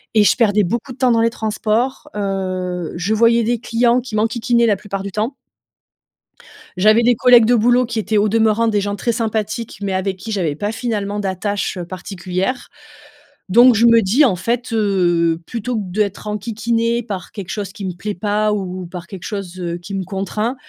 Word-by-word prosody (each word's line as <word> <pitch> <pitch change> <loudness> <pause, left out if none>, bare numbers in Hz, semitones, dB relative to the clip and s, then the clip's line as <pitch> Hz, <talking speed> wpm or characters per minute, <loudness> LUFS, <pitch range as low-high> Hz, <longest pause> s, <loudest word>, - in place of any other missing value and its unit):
et 215 - +6
je - - +4
perdais 210 -4 +3
beaucoup 235 +8 -3
de 250 - -10
temps 255 -2 +3
dans 230 - +3
les 230 - +3
transports, 220 +3 -2
heu. 185 -3 -3
Je 180 +5 -1
voyais 230 +1 +4
des 235 +1 0
clients 235 +1 +2
qui 240 -3 -7
m'enquiquinaient 235 +2 +1
la 215 -3 +3
plupart 195 0 -6
du 200 - -5
temps 220 +7 -2 1.4
j'avais 215 +5 +5
des 245 +1 +4
collègues 245 -1 +6
de 245 +2 +4
boulot 245 +2 +3
qui 230 -1 -3
étaient 215 0 0
au 205 +1 +3
demeurant 225 +1 +2
des 210 -2 +1
gens 205 0 -3
très 235 +4 -1
sympathiques, 220 0 -3
mais, 200 -1 -2
avec, 190 0 -1
qui 220 +4 -7
j'avais 175 -8 -1
pas 205 +6 -3
finalement 210 -4 -2
d'attache 195 0 -2
particulière. 185 +5 -4 0.8
Donc, 240 +4 +7
je 225 +3 +4
me 230 -1 +6
dis, 225 +10 +4
en 215 -8 +2
fait, 235 +7 -2
heu, 175 -6 +2
plutôt 235 +3 -4
que 210 - -2
d'être 205 +1 -2
enquiquinée 230 +2 -1
par 195 -5 -6
quelque 190 -3 -8
chose 200 -3 -4
qui 205 -4 -7
me 185 - -3
plaît 205 +4 -5
pas 210 +3 0
ou 185 -3 -4
par 180 0 -8
quelque 185 -1 -10
chose, 190 -3 -6
heu, 170 -1 -3
qui 175 +3 -9
me 195 -1 -2
contraint. 210 +6 -3
210 Hz, 195 wpm, -19 LUFS, 190-230 Hz, 1.4 s, Donc